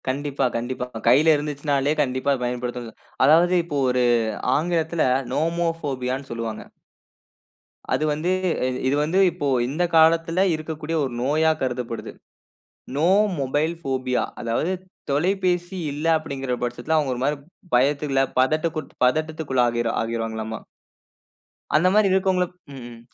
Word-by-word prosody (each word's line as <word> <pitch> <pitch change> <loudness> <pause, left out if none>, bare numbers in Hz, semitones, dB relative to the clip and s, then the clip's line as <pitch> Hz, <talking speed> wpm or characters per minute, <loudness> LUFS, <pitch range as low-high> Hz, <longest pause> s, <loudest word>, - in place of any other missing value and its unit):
கண்டிப்பா, 140 +1 -1
கண்டிப்பா. 125 +2 -3 0.2
கையில 150 +7 +6
இருந்துச்சுனாலே 145 -1 -1
கண்டிப்பா 130 0 0
பயன்படுத்தணும். 120 -1 -4 0.3
அதாவது 170 +5 +5
இப்போ 150 -4 -3
ஒரு 125 0 +2 0.5
ஆங்கிலத்தில 165 0 0 0.3
நோமோபோபியான்னு 150 -5 -2
சொல்லுவாங்க. 115 -2 -4 1.3
அது - - +1
வந்து 160 +5 -1 0.6
இது 135 - +2
வந்து 165 +6 +1
இப்போ 165 -4 -3 0.2
இந்த 150 +7 -1
காலத்தில 165 +2 +4
இருக்கக்கூடிய 155 0 -5
ஒரு 130 -3 -3
நோயா 155 +5 +2
கருதப்படுது. 125 -3 -3 0.8
"No 155 +4 +2 0.3
mobile 145 +5 0
phobia." 130 -2 0 0.2
அதாவது 120 +9 -1 0.4
தொலைபேசி 180 +3 0
இல்ல 145 +3 -5
அப்படிங்கிற 135 -4 -4
பட்சத்தில 120 +6 -1
அவங்க 140 -4 0
ஒரு 120 - -6
மாரி 145 +2 +1 0.4
பயத்துக்குள்ள 135 +1 +2 0.2
பதட்டகுட் 155 +3 0
பதட்டத்திற்குள்ளாகி 130 -5 0 0.2
ஆகிற்றாங்கலாமா. 115 -1 -3 1.2
அந்த 160 +4 +4
மாரி 210 -1 +4
இருக்கவங்கள 190 -1 +2 0.3
ம். 120 -3 -10
145 Hz, 110 wpm, -23 LUFS, 125-160 Hz, 1.3 s, கையில